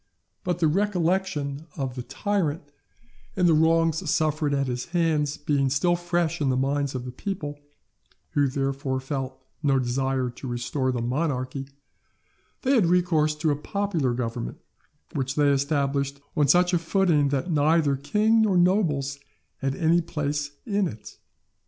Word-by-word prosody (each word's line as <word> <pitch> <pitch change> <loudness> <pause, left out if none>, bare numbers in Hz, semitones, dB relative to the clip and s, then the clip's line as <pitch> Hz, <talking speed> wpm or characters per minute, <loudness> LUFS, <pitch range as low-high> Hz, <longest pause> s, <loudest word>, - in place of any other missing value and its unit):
But 180 -2 -1
the 165 -2 +2
recollection 170 -5 0
of 135 -3 -2
the 125 - -5
tyrant 165 - -1 0.7
and 180 -2 +3
of 165 - +5
the 155 - +4
wrongs 165 +1 +2
suffered 155 -1 +1
at 140 -1 +1
his 125 -1 -3
hands 160 -4 0
being 145 -2 +1
still 160 +6 +2
fresh 175 -2 -1
in 140 - +2
the 130 - +1
minds 140 +1 0
of 125 -1 -4
the 125 - -5
people, 145 -1 -5 0.7
who 145 -1 +2
therefore 135 0 -1
felt 135 -1 -4 0.2
no 140 -3 +3
desire 130 0 0
to 125 +2 -9
restore 125 +2 -1
the 120 -2 -2
monarchy, 135 0 -2 1.0
they 265 +1 +3
had 220 -10 +4
recourse 165 -4 +2
to 150 0 0
a - - +1
popular 165 -5 -1
government, 115 - -4 0.6
which 135 0 -2
they 145 -1 +4
established 140 0 0 0.2
on 145 -1 +3
such 180 +4 +4
a 175 - +3
footing 165 -4 +2
that 140 +5 -1
neither 150 -1 +3
king 215 +11 +2
nor 205 -4 +3
nobles 155 -7 +2 0.4
had 135 0 -2
any 170 +1 +3
place 145 -3 -2 0.2
in 200 -3 +1
it. 110 -6 -10
145 Hz, 155 wpm, -25 LUFS, 135-170 Hz, 1.0 s, of